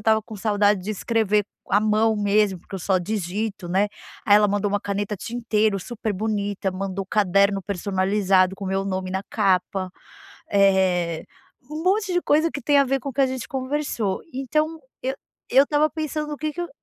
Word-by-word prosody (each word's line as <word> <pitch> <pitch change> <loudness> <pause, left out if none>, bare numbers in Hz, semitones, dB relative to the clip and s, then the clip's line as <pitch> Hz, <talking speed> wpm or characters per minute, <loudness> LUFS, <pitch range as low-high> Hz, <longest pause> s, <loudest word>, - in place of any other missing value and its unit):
estava 220 +1 +3
com 220 +1 -11
saudade 205 -1 +2
de 210 - -4
escrever 215 -1 +1 0.3
a 205 - +5
mão 215 +1 +2
mesmo, 205 -2 +2
porque 195 - -12
eu - - -3
só 190 +2 +2
digito, 200 0 -3
né, 195 +3 +2 0.4
aí 205 - +7
ela 210 0 +4
mandou 205 0 0
uma 205 0 0
caneta 205 0 -3
tinteiro 220 -1 0
super 220 +1 -4
bonita, 205 -1 -2
mandou 195 0 -4
caderno 200 -1 +2
personalizado 190 0 +1
com 200 - -7
o 190 - -3
meu 195 0 0
nome 185 -1 -3
na 190 - -1
capa, 190 -2 +1 0.6
eh, 190 -4 +2 0.5
um 310 +1 -4
monte 380 +1 +1
de 355 - +2
coisa 315 +3 +3
que 285 - -5
tem 290 +3 +3
a 280 - +5
ver 270 +1 0
com 275 - -5
o - - -10
que 280 - -1
a - - +4
gente 255 -5 -5
conversou. 260 -7 -2
Então, 305 +5 -1 0.2
eu 265 +1 -1 0.4
eu 270 +2 +6
estava 295 +1 +2
pensando 305 -1 -3
o 295 - -4
que 310 0 -2
que 350 - -6
eu 345 - -3
210 Hz, 195 wpm, -23 LUFS, 195-255 Hz, 0.6 s, aí